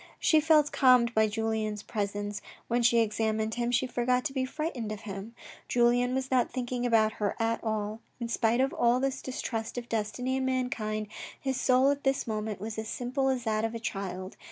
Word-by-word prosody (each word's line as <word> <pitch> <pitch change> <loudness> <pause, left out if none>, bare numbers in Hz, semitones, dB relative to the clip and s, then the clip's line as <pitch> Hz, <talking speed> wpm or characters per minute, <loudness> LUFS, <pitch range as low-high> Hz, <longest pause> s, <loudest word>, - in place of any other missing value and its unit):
She 315 -1 +4
felt 305 -1 +4
calmed 250 -3 +5
by 220 -1 +4
Julien's 215 -1 -2
presence. 205 0 -3 0.3
When 240 +1 +1
she 235 0 +4
examined 220 0 +1
him 240 0 -1
she 245 +1 +2
forgot 250 +1 0
to 280 - -2
be 260 -1 0
frightened 260 -6 -4
of 215 0 -5
him. 205 +2 -7 0.3
Julien 245 +1 +3
was 265 0 -2
not 255 -2 +3
thinking 245 -1 -2
about 220 -2 +4
her 205 - 0
at 225 0 0
all. 215 -1 -2 0.2
In 235 - -3
spite 235 +1 +2
of 270 +1 +1
all 240 +1 +3
his 270 0 -1
distrust 230 -2 -4
of 240 -1 -4
destiny 230 +4 -1
and 265 - -1
mankind, 220 -5 -1 0.3
his 265 -2 -2
soul 260 +2 +4
at 285 0 -3
this 270 0 +1
moment 215 -3 -3
was 220 +2 -5
as 220 - -4
simple 260 +2 -1
as 255 -2 0
that 215 -1 0
of 225 +1 -2
a - - -3
child. 190 -3 -5
235 Hz, 200 wpm, -29 LUFS, 215-255 Hz, 0.3 s, calmed